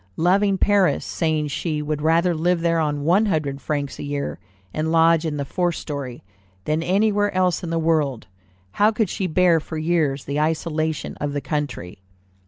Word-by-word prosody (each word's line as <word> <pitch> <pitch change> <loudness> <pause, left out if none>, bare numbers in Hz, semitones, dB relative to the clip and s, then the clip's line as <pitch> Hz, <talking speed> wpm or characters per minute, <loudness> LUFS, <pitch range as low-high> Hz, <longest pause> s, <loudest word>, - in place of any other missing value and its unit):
Loving 195 +3 +3
Paris, 200 -2 +2
saying 155 -3 -1
she 155 +2 -2
would 150 0 -3
rather 165 +3 +3
live 170 +2 +1
there 165 0 +2
on 145 -2 -1
"one 190 +8 +3
hundred 145 -6 -1
francs 145 -2 -3
a - - -5
year, 145 0 -4 0.3
and 155 +1 -1
lodge 165 0 +4
in 150 -1 -3
the 140 - -2
fourth 175 +3 -1
story," 140 -5 -6 0.4
than 155 +1 0
anywhere 205 +3 +2
else 185 -2 +1
in 170 - -4
the 165 - -1
world, 155 -7 0 0.5
how 205 - +3
could 215 -3 -1
she 190 - -2
bear 175 0 +3
for 160 +1 -7
years 155 -4 0
the 140 +1 -2
isolation 155 0 -1
of 145 -1 -3
the 145 - -2
country? 140 - -4
160 Hz, 180 wpm, -22 LUFS, 150-175 Hz, 0.5 s, lodge